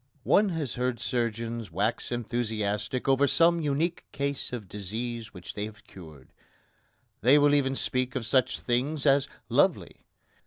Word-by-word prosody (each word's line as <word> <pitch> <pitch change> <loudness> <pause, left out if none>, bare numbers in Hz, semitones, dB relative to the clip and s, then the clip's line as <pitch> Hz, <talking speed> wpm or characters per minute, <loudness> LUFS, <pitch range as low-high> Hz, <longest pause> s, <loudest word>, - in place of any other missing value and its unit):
One 205 - +4
has 160 -7 -3
heard 125 -1 -1
surgeons 115 -3 -2
wax 105 +9 -1
enthusiastic 115 -1 -2
over 135 +1 +4
some 170 +3 +4
unique 155 +4 -1
case 140 -1 -3
of 115 -5 -6
disease 110 +4 -5
which 90 -1 -9
they 105 - -3
have 110 0 -11
cured. 80 -7 -14 0.9
They 130 +8 +6
will 145 0 +5
even 135 -2 +2
speak 130 -1 -1
of 125 -3 -2
such 125 +3 +2
things 135 +5 -1
as 140 -1 +4 0.2
"lovely." - - +2
125 Hz, 145 wpm, -28 LUFS, 110-140 Hz, 0.9 s, They